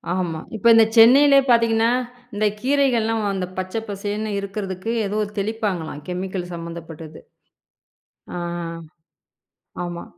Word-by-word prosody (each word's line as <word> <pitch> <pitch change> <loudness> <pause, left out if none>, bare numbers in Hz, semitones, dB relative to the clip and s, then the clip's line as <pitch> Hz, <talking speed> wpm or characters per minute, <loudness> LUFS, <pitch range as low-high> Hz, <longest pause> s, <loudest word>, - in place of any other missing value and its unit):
ஆமா, 170 -4 -2 0.2
இப்ப 220 +2 0
இந்த 225 0 +7
சென்னையிலே 275 +5 +7
பார்த்தீங்கன்னா, 230 -1 +4 0.4
இந்தக் 210 0 0
கீரைகள்லாம் 240 -5 +1
அந்த 190 -2 -2
பச்சை 185 +4 -3
பசேல்னு 205 +2 -3
இருக்கிறதுக்கு 200 +1 -4
ஏதோ 205 +2 -2 0.2
தெளிப்பாங்களாம் 195 -8 -3
கெமிக்கல் 180 0 -4
சம்பந்தப்பட்டது. 165 -2 -8 1.2
அ - - -3 1.5
ஆமா. 175 0 -6
205 Hz, 100 wpm, -22 LUFS, 180-225 Hz, 1.5 s, இந்த